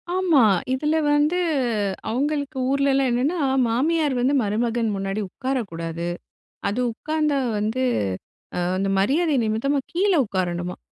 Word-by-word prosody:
ஆமா. 345 -8 +4 0.3
இதுல 300 +4 0 0.2
வந்து 295 +4 +2 0.7
அவங்களுக்கு 285 +3 -1
ஊருலலாம் 275 -1 +2
என்னென்னா, 265 +9 0 0.3
மாமியார் 295 +5 +1
வந்து 255 +3 +2
மருமகன் 225 +2 0
முன்னாடி 195 +2 -2
உட்காரக்கூடாது. 170 -10 -4 0.6
அது 205 +5 -1
உட்காந்தா 305 +3 -1 0.2
வந்து 220 +5 -1 0.8
அ - - 0 0.2
அந்த 195 +1 0
மரியாத 295 - +2
நிமித்தமா 225 +6 0
கீழ 390 +4 +2
உட்காரணுமாம். 180 -2 -3
260 Hz, 110 wpm, -23 LUFS, 210-295 Hz, 0.8 s, ஆமா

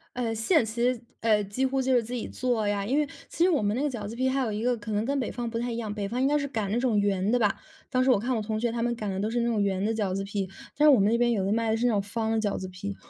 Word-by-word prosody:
呃， 240 -2 -1
现 225 - +2
实 240 +2 0 0.2
呃， 215 -2 +3
几 205 +7 -1
乎 265 0 0
就 260 0 +1
是 245 - +4
自 235 +3 -7
己 245 - -3
做 245 -4 -1
呀， 200 -1 0
因 260 +7 +1
为 300 -1 +2 0.2
其 335 - 0
实 365 - +5
我 310 -6 +2
们 205 +1 0
那 265 - -1
个 295 - +1
饺 225 -6 -5
子 225 - -7
皮 260 +2 +1
还 270 +1 0
有 235 -4 -1
一 210 +1 -3
个 245 0 +2
可 215 0 -7
能 210 0 0
跟 280 +2 0
北 250 - -2
方 240 -2 -4
不 230 0 -3
太 240 +1 -2
一 230 - -3
样， 220 -3 -3
北 205 -2 -3
方 240 +5 -2
应 265 - +3
该 295 +1 +3
是 280 -1 -2
擀 220 -7 -3
那 230 - +1
种 240 -4 +2
圆 200 -1 +1
的 245 - +4
吧， 210 -3 +1 0.3
当 255 0 +2
时 265 - +2
我 245 - +6
看 245 +3 -1
我 220 - -1
同 215 0 -2
学 235 0 0
他 235 0 -2
们 240 0 0
擀 215 -3 -4
的 190 - -3
都 210 - -1
是 240 +1 0
那 235 - +1
种 225 -3 +1
圆 195 -1 0
的 220 +2 +1
饺 205 -4 -1
子 195 +1 -2
皮。 195 -1 -3 0.3
但 300 - +4
是 - - +9
我 245 - +5
们 200 +2 +4
那 235 - +3
边 240 0 +3
有 200 -5 0
的 195 - 0
卖 225 0 +1
的 225 - +1
是 240 - 0
那 245 - +4
种 205 -2 +1
方 220 +2 -2
的 225 - +1
饺 205 -2 -1
子 185 - -5
皮， 190 +2 -6
225 Hz, 390 characters per minute, -27 LUFS, 205-250 Hz, 0.3 s, 是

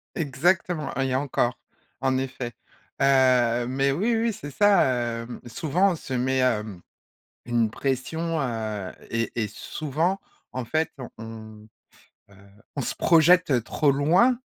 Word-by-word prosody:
Exactement 160 +1 0
et 135 -1 0
encore, 130 -3 0 0.4
en 130 -1 +1
effet. 130 -2 -4 0.5
Heu, 125 -3 +4
mais 135 +1 +1
oui, 225 +10 +1
oui, 230 0 +1
c'est 145 -6 -8
ça, 205 +4 +4 0.4
hem. 120 +1 -8
Souvent, 175 +9 +1
on - - -3
se 135 - -6
met, 130 +1 +1
hem, 105 -7 0 0.6
une 120 -2 +1
pression, 155 +6 -2
heu, 110 -6 -3 0.2
et 115 0 -1
et - - -4
souvent, 155 - -2 0.3
en 130 -1 -3
fait, 155 +7 0 0.3
on, 110 -1 -10 0.6
heu, - - -18 0.4
on 140 - -2
se - - -2
projette 165 -6 +4
trop 145 +2 +2
loin 180 - +3
135 Hz, 130 wpm, -25 LUFS, 120-160 Hz, 0.6 s, Heu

